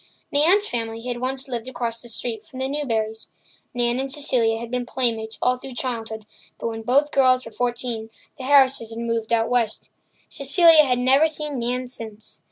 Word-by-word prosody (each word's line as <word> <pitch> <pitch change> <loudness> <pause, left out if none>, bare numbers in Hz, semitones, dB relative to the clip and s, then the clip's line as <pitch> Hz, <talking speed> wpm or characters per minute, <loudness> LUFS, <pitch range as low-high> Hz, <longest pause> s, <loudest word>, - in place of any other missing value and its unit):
Nan's 355 +9 +3
family 225 -1 -4
had 245 -1 -3
once 265 +2 -2
lived 240 -2 -4
across 235 -3 -3
the 240 - -8
street 225 -1 -3
from 255 - -13
the 260 0 -2
Newburys. 225 -6 -2 0.5
Nan 240 0 +1
and 270 0 -3
Cecilia 250 -6 +1
had 235 0 -7
been 250 0 -1
playmates 230 -3 0
all 250 0 +3
through 255 0 -9
childhood, 225 -4 -4 0.3
but - - -3
when 225 0 -6
both 275 +6 +2
girls 255 -2 +3
were 225 - -9
fourteen 240 -1 -2 0.3
the 260 - -5
Harrises 265 -4 +4
had 225 - -8
moved 230 -1 -2
out 230 -1 +2
west. 240 -3 -1 0.4
Cecilia 310 +2 +5
had 250 -2 +1
never 265 +5 +4
seen 300 -3 -4
Nan 250 +2 -2
since. 220 -3 -5
245 Hz, 180 wpm, -23 LUFS, 230-265 Hz, 0.5 s, Cecilia